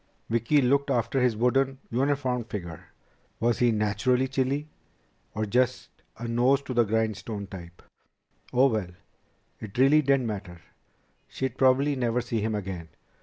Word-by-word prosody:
Vicki 115 +5 +2
looked 140 +3 +2
after 120 +2 +1
his 125 -3 +2
wooden, 135 +3 +2
uniformed 130 -2 0
figure. 85 -6 -6 0.5
Was 120 0 +1
he 120 -1 +4
naturally 110 +5 +1
chilly, 135 +3 -1 0.7
or 110 0 -1
just 125 +4 0 0.3
a 120 +1 -5
nose 125 +4 +2
to 130 - -5
the 120 -1 +3
grindstone 110 -1 -2
type? 85 -3 -11 0.7
Oh, 125 +2 +4
well! 110 -8 0 0.7
It 110 -1 -9
really 140 +4 +5
didn't 135 -3 +2
matter. 100 -5 -5 0.7
She'd 130 -2 -4
probably 135 +2 +3
never 120 -2 0
see 115 -2 -2
him 110 0 -1
again. 95 -5 -5
120 Hz, 140 wpm, -27 LUFS, 110-130 Hz, 0.7 s, really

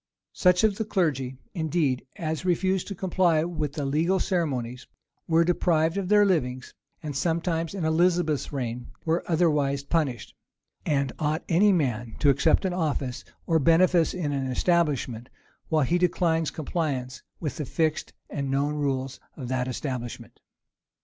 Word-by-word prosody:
Such 180 +1 +3
of 210 -2 +3
the 220 - 0
clergy, 145 - -1 0.2
indeed, 160 -7 0
as 160 -1 -3
refused 185 +1 +1
to 200 - -5
comply 175 -3 +2
with 155 -4 -3
the 145 -2 -3
legal 165 +7 +1
ceremonies, 130 -10 -2 0.4
were 165 0 +4
deprived 165 -1 +2
of 195 -2 -2
their 210 0 +6
livings, 130 -9 -1 0.3
and 150 -2 -5
sometimes, 165 +2 -1
in 180 -5 -2
Elizabeth's 165 -2 +1
reign, 125 -3 -4 0.2
were 165 +1 +1
otherwise 150 -5 +1
punished: 140 -7 -1 0.5
and 140 -3 +1
ought 155 +1 0
any 200 +5 +4
man 120 - -1
to 145 - +4
accept 140 +8 +2
of 185 - 0
an 180 - -3
office 140 -6 -2 0.2
or 165 -1 +2
benefice 165 +2 +4
in 160 -5 -2
an 135 -2 -1
establishment, 130 -5 0 0.4
while 155 -2 +3
he 175 +6 +1
declines 165 -3 +1
compliance 140 -5 -3 0.2
with 150 -6 -4
the 150 - -3
fixed 155 +3 -1 0.2
and 140 -2 -4
known 140 +2 0
rules 135 -3 -2 0.2
of 130 -4 -6
that 130 -1 -1
establishment? 125 -2 -5
155 Hz, 150 wpm, -26 LUFS, 135-175 Hz, 0.5 s, their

